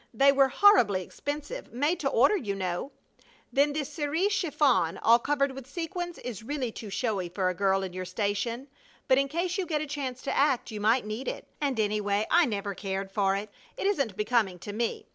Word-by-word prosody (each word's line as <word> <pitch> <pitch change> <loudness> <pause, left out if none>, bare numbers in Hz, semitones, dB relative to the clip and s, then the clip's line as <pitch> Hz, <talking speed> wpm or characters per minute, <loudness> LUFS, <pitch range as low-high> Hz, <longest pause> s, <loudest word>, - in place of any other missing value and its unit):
They 275 +4 +6
were 275 -1 +4
horribly 265 - +5
expensive 295 - -6
made 295 +8 0
to 275 - 0
order, 275 - +4
you 210 - -2
know. 185 +7 -3 0.6
Then 285 +2 +3
this 295 0 -4
cerise 320 +6 0
chiffon, 275 - +2
all 230 +1 +5
covered 280 +1 +1
with 265 -1 -9
sequins, 345 +2 -4
is 235 -6 -6
really 255 0 -3
too 215 -1 -8
showy 195 -4 -2
for 185 +1 0
a - - -1
girl 195 0 +1
in 185 -2 -5
your 185 0 -4
station, 215 +6 -2 0.4
but 260 0 +5
in 275 - +1
case 345 +6 -2
you 370 - -1
get 310 -3 0
a 305 - -2
chance 275 -4 -5
to - - -2
act 275 -4 +2
you 210 -1 -5
might 225 +3 +3
need 215 +5 -5
it, - - -4 0.2
and 275 -5 0
anyhow 210 -1 +1
I 340 -2 +5
never 200 -3 -3
cared 195 0 -4
for 195 -1 +2
it. 205 +1 -5 0.3
It - - -3
isn't 275 - 0
becoming 210 -4 +1
to 205 +4 -8
me. 230 +2 -2
250 Hz, 205 wpm, -28 LUFS, 205-290 Hz, 0.6 s, They